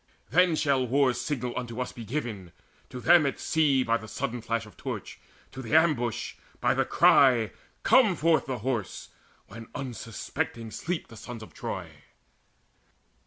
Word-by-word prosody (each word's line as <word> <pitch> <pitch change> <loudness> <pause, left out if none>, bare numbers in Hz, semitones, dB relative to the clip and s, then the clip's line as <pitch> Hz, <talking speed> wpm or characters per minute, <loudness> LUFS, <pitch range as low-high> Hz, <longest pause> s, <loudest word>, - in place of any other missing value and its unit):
Then 175 +2 +4
shall 140 -4 +1
war's 130 0 +2
signal 125 -5 -3
unto 120 -1 -5
us 125 - -2
be 120 - -9
given 110 - -4 0.4
To 125 - -7
them 170 +4 +6
at 135 - -3
sea, 145 -5 +2
by 115 -2 0
sudden 115 +2 -4
flash 115 0 -2
of 105 - -15
torch, - - -6 0.3
To 130 - -7
the 130 +4 -1
ambush, 145 -9 +2 0.3
by - - +2
the - - +1
cry, 120 -5 +5 0.3
`Come 215 -9 +5
forth 160 +1 +2
the 130 -2 -2
Horse!' 120 -8 -3 0.4
When 115 +2 -11
unsuspecting 115 -2 -4
sleep 175 +6 -4
the 115 - -12
sons 115 0 -8
of - - -13
Troy." - - -5
125 Hz, 155 wpm, -28 LUFS, 115-145 Hz, 0.4 s, them